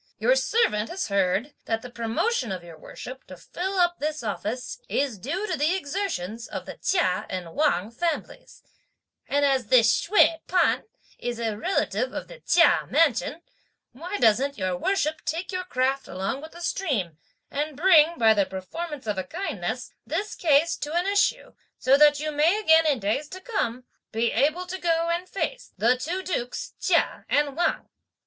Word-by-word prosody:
Your - - +3
servant 225 - +1
has 365 - -3
heard 200 +7 +1
that 225 0 -1
the 250 - -9
promotion 235 - -1
of 185 -2 -5
your 170 -1 -11
worship 255 +11 -10
to 185 - -10
fill 380 - -4
up 350 -1 +2
this 305 -2 -3
office 230 - -4
is 270 -7 -1
due 340 - -3
to 360 - -1
the 310 +5 +1
exertions 280 - -3
of - - -6
the - - -8
Chia 345 - +1
and 180 -3 -5
Wang 255 - +1
families; 335 - -4 0.6
and 285 0 +2
as 265 -5 +1
this 230 -1 +6 0.2
Hsüeh 335 -4 +5
P'an 360 -1 +2 0.3
is 240 -1 -3
a 225 -2 -2
relative 380 - -1
of - - -5
the - - -12
Chia - - +4
mansion, 290 +1 +2 0.5
why 345 +10 -5
doesn't 255 - +3
your 185 -2 -1
worship 315 - 0
take 330 +6 -3
your 365 -1 -3
craft 265 -3 0
along 195 +9 -3
with 315 +1 -10
the 345 - -11
stream, 230 - -2 0.3
and 295 0 -3
bring, 335 -1 +5
by 225 -2 +5
the 200 -2 +1
performance 290 - -6
of 210 -3 -2
a - - -2
kindness, 380 - -4 0.2
this 415 +1 -2
case 320 0 +3
to 295 +2 -5
an 350 +1 +1
issue, 405 +1 +1 0.2
so 260 +1 +4
that 295 0 +6
you 305 +1 -2
may 315 +7 +3
again 325 -5 +5
in 290 -3 +3
days 225 +8 -1
to 370 - -8
come, 255 - -2 0.3
be 230 +1 +1
able 310 +6 +1
to 370 +1 -6
go 335 -1 +1
and 350 +2 -2
face - - -4
the 230 +6 +4
two 345 +9 -3
Dukes 250 -10 -3
Chia - - +1
and 290 -1 +1
Wang?" 345 - 0
290 Hz, 175 wpm, -25 LUFS, 230-350 Hz, 0.6 s, this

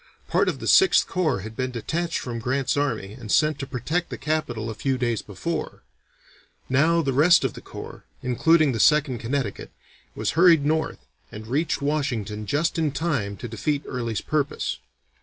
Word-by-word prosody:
Part - - +2
of - - -3
the - - -7
Sixth 380 -1 +5
Corps 160 - 0
had 110 +3 -8
been 130 +1 -2
detached 160 +8 -2
from 120 -2 -4
Grant's 130 +3 0
army 115 -9 -1
and 115 -3 -8
sent 155 -2 +3
to 140 - -4
protect 150 +7 -2
the - - -5
capital 125 -7 -2
a - - -5
few 130 +4 -1
days 120 -4 -1
before; 155 - -5 0.8
now 160 +6 +3
the 135 -2 0
rest 160 +6 +5
of - - -1
the - - -10
corps, - - -10 0.2
including 155 +4 +3
the 115 - -3
Second 145 -4 +3
Connecticut, 120 -2 -3 0.5
was - - -1
hurried 165 -4 +5
north 155 - -1 0.3
and 110 +1 -8
reached 140 +5 -1
Washington 120 -8 -2
just 165 +3 0
in 155 -3 +1
time 135 -10 -2
to 120 - -6
defeat 140 +6 -2
Early's 115 -4 -3
purpose. 150 -2 -2
135 Hz, 175 wpm, -24 LUFS, 115-155 Hz, 0.8 s, Sixth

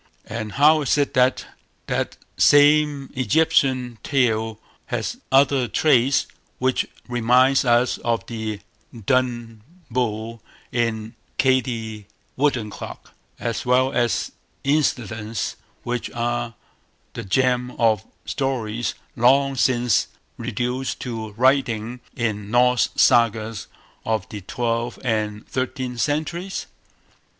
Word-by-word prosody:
and 110 -1 -5
how 150 +3 +5
is 145 - +1
it 145 -1 +1
that 130 0 +2 0.4
that - - -2 0.2
same 145 -1 +4
Egyptian 130 -4 +1
tale 115 -5 0 0.3
has 120 - -3
other 135 -1 +4
traits 135 -2 +3 0.3
which 130 0 0 0.2
reminds 125 +3 +3
us 120 0 +2
of 115 -1 -1
the 110 -3 -5 0.4
Dun 120 -3 0 0.3
Bull 115 -1 -2 0.3
in 115 -2 -1 0.2
"Katie 115 -5 0 0.3
Woodencloak", 125 -7 -2 0.3
as 115 -2 -2
well 130 +1 +2
as 120 -1 0 0.3
incidents 115 -7 -1 0.3
which 120 0 -3
are 120 -1 -2 0.6
the - - -5
germ 125 +4 +1
of 110 -3 +2 0.2
stories 120 -4 -2 0.2
long 135 +3 +4
since 125 -3 +2 0.3
reduced 125 +3 -3
to 115 -3 -5
writing 125 -1 +1 0.2
in 105 -4 -2
Norse 125 +2 +3
Sagas 115 -3 +3 0.4
of 110 -3 -1
the 105 - -7
twelfth 115 +4 -2
and 110 -3 -2
thirteenth 130 -2 -3
centuries? 170 +6 -2
120 Hz, 100 wpm, -22 LUFS, 115-130 Hz, 0.6 s, how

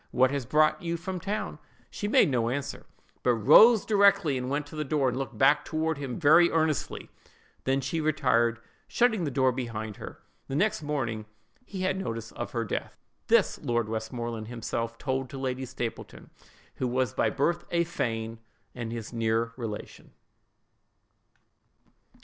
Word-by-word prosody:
What 130 +1 +3
has 140 -4 -3
brought 155 +6 +3
you 170 -1 -2
from 180 +2 -5
town?' 210 +5 -4 0.3
She 205 - -4
made - - +5
no 120 -3 +1
answer; 140 +3 -4 0.3
but 125 -1 +3
rose 195 - +7
directly, 200 -7 +4
and 125 0 -3
went 145 +2 -1
to 145 - -12
the 155 - -2
door, 140 -2 +1
and 125 - -3
looked 135 - -5
back 145 +2 +4
toward 160 -1 -2
him 135 -4 -4
very 170 +2 +6
earnestly: 160 -3 -1 0.5
then 135 +1 +1
she 150 +5 -2
retired, 125 -7 +2 0.3
shutting 220 -7 +2
the - - -1
door 130 -1 +2
behind 115 -4 -5
her. - - -9 0.3
The 135 - -4
next 205 +3 +1
morning 120 -8 -3 0.4
he 190 -2 -6
had 185 0 0
notice 115 - -4
of 120 - -5
her 115 -2 -1
death. - - -4 0.3
This, - - +3
Lord 120 -2 0
Westmoreland 115 0 -4
himself 115 0 -4
told 130 -1 -2
to 135 - -8
Lady 130 0 -3
Stapleton, 120 -2 -6 0.5
who 130 - -1
was 125 -2 0
by 110 - +1
birth 170 +8 0
a 170 0 +2
Fane, 115 -8 -3 0.3
and 120 -2 -5
his 115 0 -6
near 115 0 0
relation." 115 -4 -7
130 Hz, 160 wpm, -28 LUFS, 115-155 Hz, 0.5 s, rose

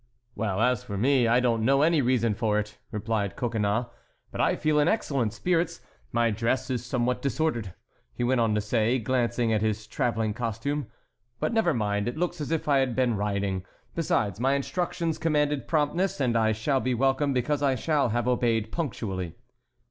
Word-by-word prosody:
"Well, 105 -2 -1
as 125 -2 +2
for 100 - -5
me, 125 +2 +3
I 120 +2 +4
don't 115 -3 +1
know 135 +4 +4
any 160 -1 +4
reason 120 -3 +2
for 105 0 0
it," 105 0 -4
replied 105 -2 -2
Coconnas, 115 -1 0 0.5
"but - - -2
I - - +3
feel 155 -1 +1
in 145 - +3
excellent 135 - 0
spirits. 170 - 0 0.3
My 120 -1 +2
dress 115 +5 -1
is 120 -2 -2
somewhat 125 0 -1
disordered," 135 - -1 0.4
he - - -4
went 125 0 +2
on 110 -2 +2
to 105 - +1
say, 110 +3 +1
glancing 120 -1 0
at 105 - +1
his 110 -1 -1
travelling 115 -3 -1
costume, 120 +5 -3 0.5
"but - - -1
never 225 -6 +3
mind, 105 -4 -1
it 120 - -3
looks 175 -1 -2
as 145 - -3
if 165 -2 -1
I 140 -2 +4
had 130 -3 0
been 125 -3 +2
riding. 100 -2 -1 0.3
Besides, 105 - 0
my 135 +3 +2
instructions 170 +3 -2
commanded 150 -3 +1
promptness 170 +3 0
and 125 -4 +1
I 110 -1 +3
shall 110 +6 0
be 130 -1 0
welcome 135 +3 +2
because 140 +3 0
I 135 -2 +2
shall 145 +1 +1
have 120 +2 -1
obeyed 115 -3 +1
punctually." 100 - -3
120 Hz, 185 wpm, -27 LUFS, 110-140 Hz, 0.5 s, I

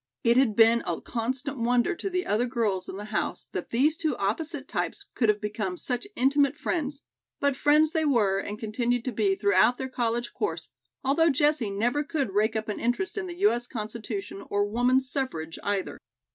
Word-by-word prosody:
It 235 +1 +4
had 250 -5 +3
been 230 +1 +6
a 170 -2 -1
constant 260 +4 -3
wonder 240 +1 +2
to 390 - -4
the 365 -1 -1
other 235 0 +1
girls 215 -7 -1
in 190 - -6
the 205 - -6
house - - -2
that 180 - -4
these 285 +7 +2
two 310 -5 -1
opposite 280 - -2
types - - -3
could 230 -4 +2
have 210 0 +3
become 210 -3 -3
such 250 - -3
intimate 280 +2 +3
friends; 300 -2 -2 0.4
but 280 -1 +1
friends 300 +3 +4
they 320 -2 +1
were, 215 -10 +2
and 205 +1 -5
continued 235 +2 -1
to 255 - -1
be 205 -3 +1
throughout 200 +4 +3
their 265 0 -4
college 240 -1 -1
course, 425 - -3 0.3
although 295 +5 +3
Jessie 295 -5 +2
never 240 +9 0
could 285 -7 -2
rake 215 +2 +2
up 220 0 -2
an 210 - -3
interest 245 +11 -1
in 410 -3 -3
the 350 -1 -7
U. 410 - +6
S. 240 0 -2
Constitution 215 -3 -5
or 205 0 +1
woman's 250 +5 +2
suffrage, 165 - -3
either. 200 -2 -2
240 Hz, 195 wpm, -27 LUFS, 210-280 Hz, 0.4 s, been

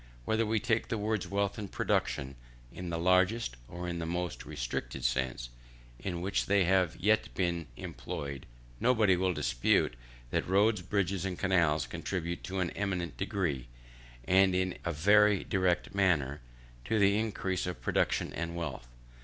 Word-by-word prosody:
Whether 110 - +1
we 110 0 +2
take 115 0 0
the 115 - -1
words 105 -1 -1
wealth 100 +1 -1
and 100 -2 -6
production 70 0 -1 0.4
in 90 +1 -6
the 85 - -2
largest, 90 - +2
or 90 +1 -6
in 85 -1 -3
the 80 - -3
most 85 0 -3
restricted - - -4
sense 60 -1 -1 0.5
in 85 +8 -4
which 95 +2 0
they 100 -1 +4
have 90 -2 +3
ever - - -15
yet 110 +1 +3
been 85 -3 -1
employed, 70 -2 -6 0.3
nobody 110 -6 +4
will 95 +1 +1
dispute - - +1 0.4
that - - 0
roads, 100 +2 +3
bridges, 95 -1 -1
and 95 -2 -3
canals, 85 -6 +2
contribute 85 -2 -4
in 95 - -5
an 85 - -1
eminent 95 -4 -2
degree, 95 - -2 0.6
and 95 0 +5
in 95 0 0
a 85 - -1
very 100 +5 +4
direct 95 -2 0
manner, 80 -9 +1 0.4
to 110 - +1
the 100 0 +4
increase 95 -5 -2
of 90 - -4
production - - +1
and 85 0 -4
wealth. 75 -8 -5
90 Hz, 160 wpm, -31 LUFS, 85-100 Hz, 0.6 s, and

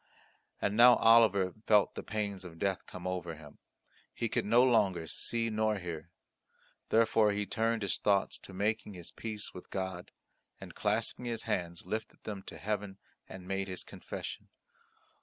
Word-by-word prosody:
And 100 - 0
now 120 +2 +9
Oliver 110 -5 +5
felt 105 -2 +5
the - - -5
pains 100 -3 -3
of 85 -2 -10
death 95 +1 -1
come 90 -1 -9
over 90 -3 -3
him. 75 -2 -14 0.6
He 115 - -1
could - - 0
no 115 +4 +5
longer 100 -9 +3
see 115 +7 -1
nor 110 0 +1
hear. 85 -3 -6 0.8
Therefore 110 -2 +4
he 105 0 -1
turned 115 +1 0
his 100 - -1
thoughts 100 -1 +1
to - - -11
making 105 +1 -1
his 85 -2 -7
peace 110 -2 -5
with 90 - -11
God, 95 -2 -4 0.5
and - - -10
clasping 110 +4 -1
his 115 -2 -2
hands 85 -7 -2
lifted 110 +4 -5
them 105 -3 -5
to - - -8
heaven 105 -2 -3 0.3
and 95 -1 -9
made 95 0 -1
his 95 -1 -3
confession. - - -7
100 Hz, 160 wpm, -32 LUFS, 95-110 Hz, 0.8 s, now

